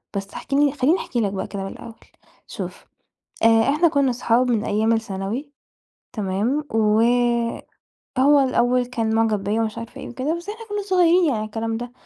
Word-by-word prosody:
بس 195 0 -5
احكِ - - -7
لي 285 0 +4
خلِّيني 295 +6 +2
أحكِي 240 - -2
لك 200 -2 -1
بقى 190 - -3
كده 200 -2 -5
من 195 - -5
الأول. 230 - -10 0.5
شوف - - -7 0.6
آآ، - - +7 0.2
إحنا 305 +5 +3
كنّا 280 -5 +2
صُحاب 245 +1 +1
من 220 -2 +1
أيام 215 +2 +1
الثانوي، 225 +5 -3 0.6
تمام؟ 215 +7 -1
و 215 0 +3 1.2
هو 285 +3 +5
الأوَّل 250 -2 +2
كان 225 -3 -2
معجب 220 -3 +1
بيّا 210 +3 0
ومش 220 0 -3
عارفة 230 0 -8
إيه - - -7
وكده، 270 +6 -2
بس 345 +4 -9
إحنا 445 +2 -7
كنّا 415 0 -2
صغيِّرين 360 -2 +4
يعني 275 -8 +1
على 215 - -3
الكلام 225 +1 -3
ده. 240 +1 -6
240 Hz, 185 wpm, -22 LUFS, 215-285 Hz, 1.2 s, آآ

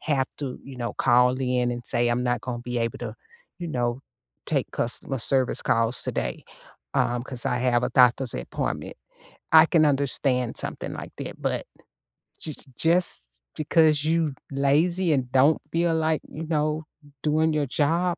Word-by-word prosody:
have 140 -4 0
to, 135 -4 -5
you 135 -2 -10
know, 120 -1 -3
call 125 0 +4
in 125 -1 +1
and 120 0 -4
say, 120 0 +1
"I'm 120 +1 0
not 125 -2 0
gonna 125 0 -4
be 120 0 -4
able 115 0 -2
to, - - -6 0.4
you 175 -1 -5
know, 120 -3 -1 0.5
take - - 0
customer 125 +3 -1
service 130 +2 +2
calls 115 +1 +1
today, - - -2 0.5
um, 120 0 +1
'cause 125 -2 -4
I 125 - 0
have 125 -1 +2
a - - -2
doctor's 125 0 +4
appointment." 60 - -4 0.6
I 160 0 +9
can 165 -2 +3
understand 135 -3 +2
something - - -3
like - - -8
that, - - -7
but - - -1 0.7
jus 155 - -6
just 165 - +1 0.3
because 155 -1 +3
you 160 -2 +1 0.2
lazy 155 +6 +2
and 125 -3 -1
don't 135 +4 +4
feel 165 0 +1
like, 160 -1 +1
you 160 - -6
know, 155 0 0 0.4
doing 155 +1 +2
your 150 -1 +1
job, 170 +6 +1
135 Hz, 160 wpm, -25 LUFS, 125-155 Hz, 0.7 s, I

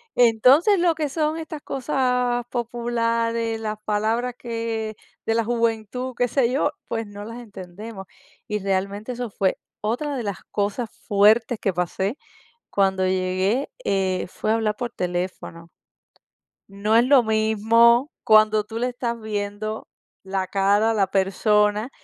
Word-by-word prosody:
Entonces, 255 - +5
lo 340 -1 +3
que 305 -1 -1
son 310 +2 -1
estas 315 -2 -6
cosas 250 -3 0
populares, 230 -1 -1
las 215 -1 -3
palabras 225 +4 0
que 230 -2 -4 0.3
de 225 - +1
la 230 - +2
juventud, 235 +2 -1
qué 245 - +2
sé 245 0 +1
yo, 290 +3 +1 0.2
pues 225 -1 -3
no 205 0 -9
las 230 +2 -8
entendemos. 200 -1 -9 0.4
Y 210 - -2
realmente 200 +4 -2
eso 245 -1 -4
fue 195 -1 0 0.2
otra 265 +7 -2
de 240 - -3
las 200 -3 -4
cosas 210 +3 -1 0.2
fuertes 215 +2 +4
que 195 - 0
pasé 190 - -2 0.5
cuando 190 -1 +2
llegué, 185 +7 0
eh, 190 -2 0
fue 215 - -1
hablar 220 -2 0
por 240 0 -4
teléfono. 175 -2 -4 1.0
No 200 +3 0
es 235 +1 +6
lo 265 -1 +6
mismo 225 +4 +3
cuando 215 -1 +5
tú 220 +2 -6
le 245 - +1
estás 240 -1 -3
viendo 215 0 -4 0.4
la 190 -1 -2
cara 200 +3 +2
a - - 0
la 200 -3 +2
persona 210 +3 +2
220 Hz, 140 wpm, -23 LUFS, 200-240 Hz, 1.0 s, es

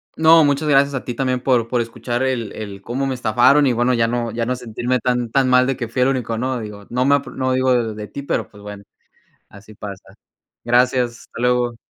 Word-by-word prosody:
No, 160 0 +6
muchas 145 +2 0
gracias 140 0 +4
a 135 - -3
ti 120 - -4
también 130 0 -1
por 120 -3 +1
por 120 0 0
escuchar 120 +1 -4
el 125 -5 -1
el 100 -2 -8
cómo 130 +5 -2
me 130 - -2
estafaron, 125 +5 +4
y 130 - +2
bueno, 120 +2 +1
ya 115 -1 +2
no 120 0 -2
ya 115 +1 -2
no 125 +2 -1
sentirme 125 +1 -2
tan 125 -1 -1
tan 135 -1 +2
mal 125 0 +5
de 135 0 -1
que 120 -2 -4
fui 125 +2 0
el 130 - +3
único, 120 -4 -2
¿no? 130 +1 -2
Digo, 105 -2 -9
no 125 +1 +1
me 140 +1 +5
a 140 - 0
p - - -10
no 130 -1 -1
digo 130 0 +2
de 115 -3 0
de 105 0 -7
ti, 140 - -7
pero, 140 - -2
pues, 105 -1 -17
bueno, 105 -1 -9 0.7
así 105 +2 -15
pasa. 100 -2 -10 0.5
Gracias, 125 0 +2
hasta 115 - -11
luego. 125 -1 +1
125 Hz, 240 wpm, -20 LUFS, 115-130 Hz, 0.7 s, No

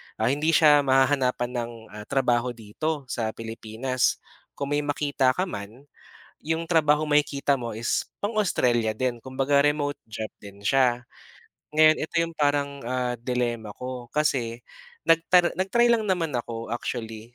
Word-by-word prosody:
ah, 110 +2 +1
hindi 150 +3 +1
siya 150 -2 +7
mahahanapan 130 -2 +2
ng 120 0 -4 0.2
ah, 105 0 -9
trabaho 125 -3 +1
dito 140 +8 -4
sa 110 -2 -2
Pilipinas. 115 +3 -1 0.4
Kung 140 0 -4
may 145 - +2
makita 145 -3 +1
ka 180 - 0
man, 115 - -7 0.6
yung 160 +2 -2
trabaho 155 -2 +3
makikita 145 -1 +2
mo 120 -3 -5
is 115 +2 -1 0.2
pang-Australia 130 - +1
din, 120 +3 -1
kumbaga 135 +2 +2
remote 145 -1 +1
job 110 0 -6 0.2
din 100 -1 -11
siya. 120 +2 +2 0.6
Ngayon 155 0 +5
ito 160 - -6
yung 165 0 -4
parang 145 -1 0
ah, 125 -1 -1
dilema 120 -3 -2
ko 125 -1 -6
kasi, 125 -6 0 0.5
nag 165 - +6 0.4
nag-try 235 +6 +3
lang 230 -2 +3
naman 180 -5 0
ako 115 -1 -6
actually, 115 -1 -6
130 Hz, 140 wpm, -25 LUFS, 120-150 Hz, 0.6 s, siya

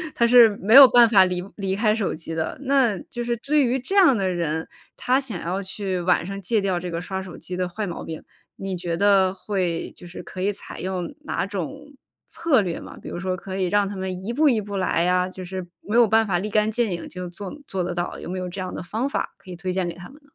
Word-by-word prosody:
他 235 - +3
是 235 -1 +8
没 215 +4 +1
有 275 -1 +12
办 240 -1 +7
法 195 -4 +6
离 180 -1 -2
离 195 -1 -1
开 215 +1 +2
手 215 -6 -1
机 165 0 -7
的。 160 0 -3
那 260 -7 +2
就 240 0 -4
是 235 0 -1
至 295 +5 +2
于 250 +1 +1
这 380 +11 -4
样 340 - +6
的 195 - 0
人， 160 -2 -2 0.3
他 255 +2 +2
想 235 -11 -3
要 185 +3 -2
去 190 -1 -3
晚 175 -1 +2
上 195 +1 -6
戒 215 +4 +1
掉 190 -3 0
这 180 - -5
个 170 -1 -3
刷 190 +1 -4
手 185 -3 -9
机 180 - -6
的 180 0 -2
坏 210 +3 -4
毛 175 - -5
病， 160 -1 -7 0.3
你 195 -1 -4
觉 170 -1 -3
得 195 -1 +4
会 185 -3 -2
就 175 - -12
是 175 - -9
可 185 - -8
以 200 +2 +1
采 200 - -9
用 185 -2 -4
哪 - - -1
种 280 +9 -6 0.4
策 290 -9 +2
略 175 -4 -3
吗？ - - -11
比 - - -9
如 175 - -5
说 185 0 -2
可 190 +1 -6
以 190 - +1
让 205 +2 +2
他 200 - -6
们 190 0 -5
一 235 - -2
步 300 +4 +4
一 235 -4 +2
步 205 -1 -6
来 180 -2 +1
呀， 180 +1 +2
就 185 0 -9
是 185 -1 -6
没 215 - -4
有 240 -2 +6
办 220 +1 +4
法 180 -4 0
立 210 +4 -3
竿 215 +1 +2
见 235 0 0
影 170 - -4
就 180 -1 -7
做 190 +2 -8
做 190 -2 -2
得 175 0 -3
到， 175 0 -3
有 - - -8
没 185 - -3
有 180 0 -4
这 185 +3 -7
样 185 -1 -4
的 - - -5
方 220 +9 -2
法 - - -3
可 185 - -13
以 - - -6
推 185 +2 -4
荐 180 -1 -1
给 170 - -4
他 175 +1 -11
们 270 - -16
呢？ 285 - -25
190 Hz, 290 characters per minute, -23 LUFS, 180-220 Hz, 0.4 s, 有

